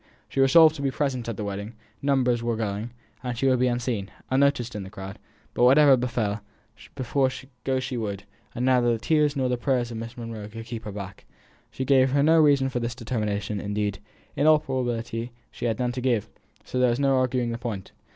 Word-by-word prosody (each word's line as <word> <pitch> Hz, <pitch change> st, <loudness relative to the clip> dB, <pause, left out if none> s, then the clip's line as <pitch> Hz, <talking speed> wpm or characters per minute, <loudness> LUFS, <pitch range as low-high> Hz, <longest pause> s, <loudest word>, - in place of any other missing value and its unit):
She -, -, -3 dB
resolved 155 Hz, +4 st, +7 dB
to -, -, -6 dB
be 140 Hz, -, +1 dB
present 130 Hz, -4 st, -2 dB
at 115 Hz, -, -4 dB
the -, -, -3 dB
wedding; 100 Hz, +2 st, -5 dB, 0.3 s
numbers 130 Hz, -4 st, +2 dB
were 115 Hz, 0 st, -1 dB
going; 110 Hz, +1 st, -3 dB, 0.5 s
she 125 Hz, -, -1 dB
would 130 Hz, -2 st, +3 dB
be 125 Hz, -, +3 dB
unseen, 120 Hz, -5 st, -2 dB, 0.2 s
unnoticed 130 Hz, -3 st, +2 dB
in 105 Hz, -, -3 dB
the 95 Hz, -, -8 dB
crowd; 95 Hz, 0 st, -8 dB, 0.3 s
but -, -, +1 dB
whatever 135 Hz, +2 st, +7 dB
befell, 120 Hz, -4 st, -1 dB, 1.2 s
go 130 Hz, -1 st, +1 dB
she 130 Hz, -1 st, -4 dB
would, 100 Hz, -3 st, -4 dB, 0.3 s
and 125 Hz, +1 st, -1 dB
neither 125 Hz, -2 st, +4 dB
the 115 Hz, -, +1 dB
tears 150 Hz, +4 st, +2 dB
nor 130 Hz, -2 st, +1 dB
the 125 Hz, 0 st, 0 dB
prayers 120 Hz, -2 st, 0 dB
of 115 Hz, -, -5 dB
Miss 115 Hz, +1 st, -7 dB
Monro 115 Hz, -3 st, -6 dB
could 115 Hz, +1 st, -9 dB
keep 115 Hz, -1 st, -7 dB
her 105 Hz, -, -5 dB
back. 100 Hz, -1 st, -8 dB, 0.4 s
She 130 Hz, -, -4 dB
gave 130 Hz, 0 st, +4 dB
no 155 Hz, +3 st, +5 dB
reason 140 Hz, -3 st, +4 dB
for 125 Hz, -, -2 dB
this 115 Hz, 0 st, -3 dB
determination; 105 Hz, -4 st, -2 dB
indeed, 105 Hz, -1 st, -2 dB, 0.4 s
in 150 Hz, -, +2 dB
all 155 Hz, 0 st, +7 dB
probability 120 Hz, -4 st, -3 dB, 0.2 s
she -, -, -6 dB
had 115 Hz, -2 st, 0 dB
none 125 Hz, -1 st, 0 dB
to 125 Hz, +1 st, -4 dB
give; 120 Hz, -5 st, +1 dB, 0.4 s
so 125 Hz, -, -3 dB
there 125 Hz, -1 st, +4 dB
was 120 Hz, +2 st, 0 dB
no 135 Hz, -1 st, +3 dB
arguing 125 Hz, -2 st, 0 dB
the 115 Hz, -, -4 dB
point. 110 Hz, -6 st, -5 dB
120 Hz, 205 wpm, -25 LUFS, 110-130 Hz, 1.2 s, resolved